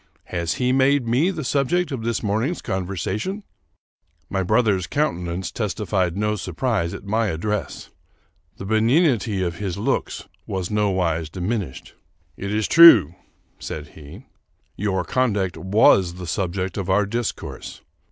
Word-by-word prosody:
Has 85 -2 -1
he 125 0 0
made 135 -1 +3
me 130 +10 +2
the 165 -5 -4
subject 145 +6 0
of 130 -4 -3
this 115 0 -2
morning's 110 - -1
conversation?" 95 - -3 0.9
My 95 - 0
brother's 100 -2 +1
countenance 90 - -2
testified 95 -3 -1
no 105 +1 0
surprise 95 -1 -2
at - - -9
my 110 +3 0
address. 105 +4 -3 0.7
The 95 - -7
benignity 110 - +2
of 85 -2 -3
his 100 -3 -4
looks 100 - -2 0.2
was 95 -1 -3
nowise 95 -7 0
diminished. 90 - -4 0.2
" 85 -3 -41
It 100 - -3
is 105 0 0
true," 125 - +8 0.5
said 75 -2 -6
he, 75 -2 -13 0.2
" - - -44
your 95 -3 0
conduct 105 -5 0
was 95 -2 +3
the 90 0 -7
subject 90 +2 -2
of 95 -1 -4
our 100 +2 +3
discourse. 115 +2 -5
100 Hz, 140 wpm, -22 LUFS, 90-115 Hz, 0.9 s, true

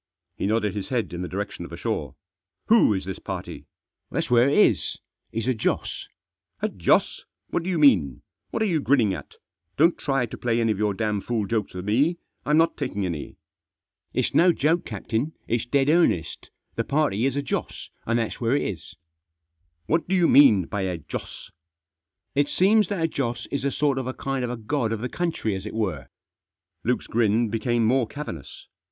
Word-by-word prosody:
He - - -2
nodded 105 -2 +1
his 100 -1 -5
head 120 -7 -1
in 85 - -4
the 90 - -3
direction 100 +3 -4
of - - -8
the - - -8
shore. - - -3 0.2
" - - -60
Who 225 - +6
is 95 -3 -1
this 95 -1 -5
party?" - - -7 0.2
" - - -60
That's - - -2
where 120 +2 +5
it - - +1
is; - - +3 0.3
he's 115 +1 -3
a 130 - +3
Joss." 110 - -2 0.5
"A - - 0
Joss? - - +1 0.3
What - - 0
do 175 - -4
you 180 - 0
mean? 90 - +4 0.3
What - - -1
are - - +2
you 170 -6 +1
grinning 125 -8 +3
at? - - -8 0.4
Don't 165 +4 +4
try 135 -3 0
to 115 - -9
play 120 -1 +1
any 115 -1 +2
of 105 - -2
your 105 -2 +1
damfool 105 +1 -1
jokes 105 -2 -2
with 90 +1 -5
me, 140 - +2 0.3
I'm 150 +1 +4
not 165 +1 +3
taking 105 -9 -2
any." 85 -5 -5 0.7
"It's - - -1
no 175 +2 +6
joke, 165 +2 +1
captain; 115 +7 -3
it's 120 0 -1
dead 135 +1 +2
earnest 150 - +1 0.2
The 115 - -1
party 135 -4 +1
is 135 - -2
a 140 - -1
Joss, 135 - -4
and 115 +1 0
that's 115 +1 -3
where 120 +3 +2
it - - +1
is." 95 -5 -6 0.5
" 80 0 -49
What 165 +1 0
do 190 - +1
you 175 -2 +4
mean 110 - +6
by 100 - -3
a 90 -2 -2
Joss? 80 - -8 0.2
" 80 0 -65
" - - -58
It 145 +1 +2
seems 205 +2 +4
that 185 -4 -2
a - - +3
Joss 120 -6 -3
is 140 -2 -2
a 140 - +2
sort 140 -1 +1
of 130 - -4
a 130 - -4
kind 135 -1 -2
of 120 - -2
a 125 - -3
god 115 0 -1
of 110 - -4
the 125 - -3
country, 165 - -2
as 95 +2 -5
it 110 - -7
were." 90 - -2 0.8
Luke's - - 0
grin 115 0 +2
became 115 +1 0
more 125 +1 +2
cavernous. 110 - -8
120 Hz, 210 wpm, -25 LUFS, 100-145 Hz, 0.8 s, Who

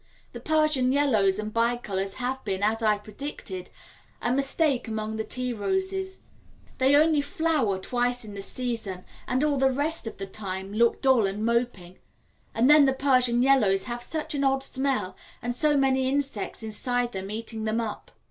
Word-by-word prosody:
The - - -7
Persian 305 -5 +2
Yellows 220 -9 +3
and 215 0 -4
Bicolors 230 -5 -1
have 260 +1 -3
been, 195 -1 -2
as 220 +2 +1
I 215 -2 +3
predicted, 205 -4 -7 0.5
a 240 - 0
mistake 275 -1 +1
among 220 0 -3
the 220 - -1
tea 250 +2 -3
roses; 380 - -2 0.6
they 265 +2 +5
only 305 0 +4
flower 290 -8 0
twice 245 +4 -1
in 210 - -9
the 200 - -6
season 225 -6 -4 0.2
and 260 +2 +1
all 290 -2 +1
the 270 0 +4
rest 290 +1 -1
of - - -6
the 195 - -5
time 190 -1 -6
look 235 +2 +2
dull 260 -6 +4
and 205 +3 -3
moping; 235 -7 -1 0.6
and 235 +3 +3
then 295 0 +8
the 270 - +3
Persian 255 -3 +3
Yellows 215 -8 +4
have 240 -1 -5
such 310 +5 -4
an 280 -1 -1
odd 270 0 +2
smell 265 -9 -1 0.2
and 245 0 -3
so 295 +3 +2
many 265 -1 +2
insects 275 -6 -2
inside 240 +3 -1
them 190 -1 -5
eating 220 +1 -5
them 220 +1 0
up. 225 -2 -5
245 Hz, 175 wpm, -26 LUFS, 215-275 Hz, 0.6 s, then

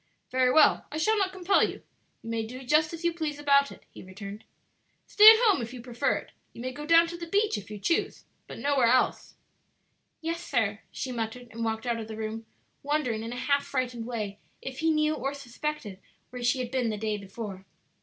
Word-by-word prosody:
"Very 255 0 +3
well, 300 +1 +5
I 305 - -4
shall 430 +8 +2
not 385 -2 +1
compel 375 +1 +2
you; - - -3 0.4
you 230 - -7
may 225 -1 -1
do 250 +4 -8
just 305 +4 +3
as 335 0 -7
you 340 - +2
please 310 -3 -3
about 280 -1 +3
it," - - -13
he - - -11
returned. 200 +2 -9 0.6
"Stay 425 +1 +9
at 445 - +9
home 415 - +4
if 235 +2 -6
you - - -8
prefer 240 -1 0
it. - - -7 0.2
You - - -9
may 255 - -3
go 295 +3 -8
down 335 +1 +7
to 340 +1 -6
the 340 0 -7
beach 410 - +1
if 205 -1 -7
you 210 - -6
choose, 210 +12 -1 0.2
but - - -9
nowhere 280 -4 +2
else." 255 +2 +1 0.8
"Yes, 335 +1 -3
sir," 220 -7 0
she 260 - -4
muttered, 235 +1 -5
and 230 +1 -5
walked 225 +1 -2
out 235 -1 -1
of 220 - -6
the 220 -1 -7
room, 220 0 -5 0.3
wondering 280 -6 -1
in 230 +1 -5
a - - -5
half 280 +3 +1
frightened 250 -3 -3
way 210 -4 -4 0.2
if 265 0 -7
he 325 +1 +2
knew 305 -1 +2
or 275 -2 -3
suspected 275 -6 -5 0.3
where 250 -1 -7
she 245 +2 +2
had 250 -2 -4
been 255 -3 0
the 215 - -2
day 215 0 -1
before. 195 -1 -8
255 Hz, 220 wpm, -28 LUFS, 225-305 Hz, 0.8 s, Stay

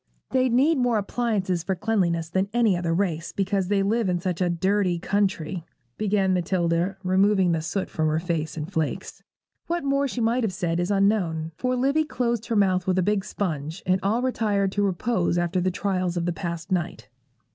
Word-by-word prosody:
'They 260 -1 +2
need 270 +5 +3
more 245 -3 +2
appliances 200 -4 -1
for 190 +3 -2
cleanliness 175 -6 0
than 190 +3 -1
any 230 -5 +3
other 175 -1 -1
race, 165 -2 -1
because 195 -1 0
they 200 0 +2
live 220 0 +1
in 175 -1 0
such 180 0 -3
a 180 - +2
dirty 185 +1 +1
country,' 190 -2 -1 0.3
began 200 -2 +1
Matilda, 175 +1 0
removing 190 0 +3
the 165 -1 0
soot 185 +4 -2
from 160 0 -1
her 155 0 +1
face 165 -3 -3
in 150 - -3
flakes. 160 -4 -3 0.5
What 345 -1 -1
more 275 0 +1
she 250 - -4
might 235 +2 +1
have 210 -4 -1
said 170 -1 -1
is 175 +1 -1
unknown; 195 -6 +1
for 255 +8 -1
Livy 275 +5 +2
closed 235 -6 -1
her 230 - -1
mouth 185 -3 +2
with 185 0 +2
a 185 - +3
big 205 0 +1
sponge, 165 -1 -4
and 185 +1 +2
all 220 +5 +1
retired 205 -6 +1
to 205 - -1
repose 185 -1 0
after 175 +1 0
the 185 - +1
trials 185 -1 -1
of 170 - -1
the 175 - 0
past 170 -1 -5
night. 170 - -2
190 Hz, 195 wpm, -25 LUFS, 175-210 Hz, 0.5 s, need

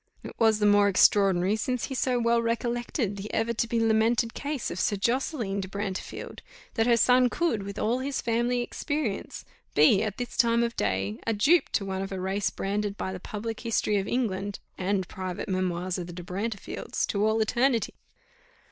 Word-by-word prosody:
It - - -8
was 220 -2 +4
the 210 - +1
more 205 0 +5
extraordinary, 195 0 +4
since 250 +2 -2
he - - -6
so 255 -1 +1
well 235 0 +2
recollected 235 -2 -1
the 200 +2 -6
ever 225 +1 0
to 235 +1 -1
be 230 0 0
lamented 225 +1 +2
case 285 -3 -3
of 185 - -5
Sir 205 - +1
Josseline 230 -1 -1
de 190 - -5
Brantefield, 200 0 -5 0.3
that 225 +1 +1
her 235 -1 +5
son 250 +2 +5
could, 325 -8 0
with 200 0 -7
all 235 +4 0
his 270 0 -2
family 240 +1 0
experience, 285 -3 -3 0.3
be, 155 +7 +6
at 215 -2 -2
this 245 -2 -5
time 235 0 +4
of 235 0 -2
day, 95 +3 -1
a 225 - +2
dupe 290 +12 +3
to 200 - +1
one 190 -1 -3
of 195 - -5
a 190 - -3
race 195 +2 -1
branded 205 +1 -2
by 190 - -3
the 185 - -6
public 215 +4 -5
History 220 -2 0
of 195 0 -1
England, 205 -5 -1 0.2
and 190 -1 -1
private 185 -2 -5
Memoirs 185 -1 -1
of 175 - -5
the 175 - -8
De 175 0 -7
Brantefields, 200 +3 -3
to 200 0 -1
all 220 +1 +2
eternity! 235 +2 +1
215 Hz, 190 wpm, -27 LUFS, 195-235 Hz, 0.3 s, be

